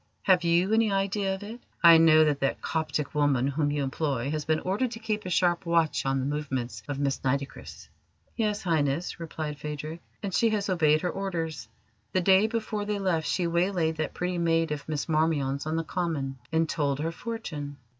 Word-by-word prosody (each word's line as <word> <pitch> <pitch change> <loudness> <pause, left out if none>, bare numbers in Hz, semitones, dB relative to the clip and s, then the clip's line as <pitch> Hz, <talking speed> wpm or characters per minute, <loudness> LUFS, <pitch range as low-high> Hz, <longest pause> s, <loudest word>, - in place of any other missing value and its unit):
Have 185 -2 +4
you 175 +4 +2
any 225 -1 +3
idea 195 0 0
of 190 - -9
it? 225 +4 -8 0.2
I 165 -1 +9
know 155 -1 +6
that 145 -2 +1
that 135 - 0
Coptic 155 -2 -2
woman 145 -4 +2
whom 145 +2 0
you 145 -1 -1
employ 135 -1 -1
has 155 -1 -2
been 155 0 +1
ordered 205 +7 0
to 225 - -7
keep 215 -3 -3
a - - -3
sharp 175 0 +2
watch 165 -5 +1
on 135 0 +1
the 130 - -2
movements 135 -6 -3
of 145 - -3
Miss 140 -1 0
Nitocris." 135 +1 -3 0.5
"Yes, 210 -2 -1
Highness," 160 -1 0
replied 155 -3 -5
Phadrig, 150 +2 -5 0.2
"and 195 -2 -3
she 230 - +3
has 205 -2 -1
obeyed 155 -4 +3
her 180 - -1
orders. 165 -10 -4 0.5
The 185 - +2
day 190 +3 +5
before 220 -2 -2
they 210 0 -1
left 175 -6 0
she 175 +5 0
waylaid 170 -1 +1
that 155 -1 -3
pretty 180 0 -2
maid 165 -1 +1
of 150 0 -5
Miss 150 -2 -2
Marmion's 155 -3 0
on 155 - -1
the 165 - 0
Common, 155 -6 -3
and 160 0 +2
told 145 -4 0
her 160 +3 -2
fortune. 160 -11 -6
160 Hz, 195 wpm, -27 LUFS, 145-185 Hz, 0.5 s, I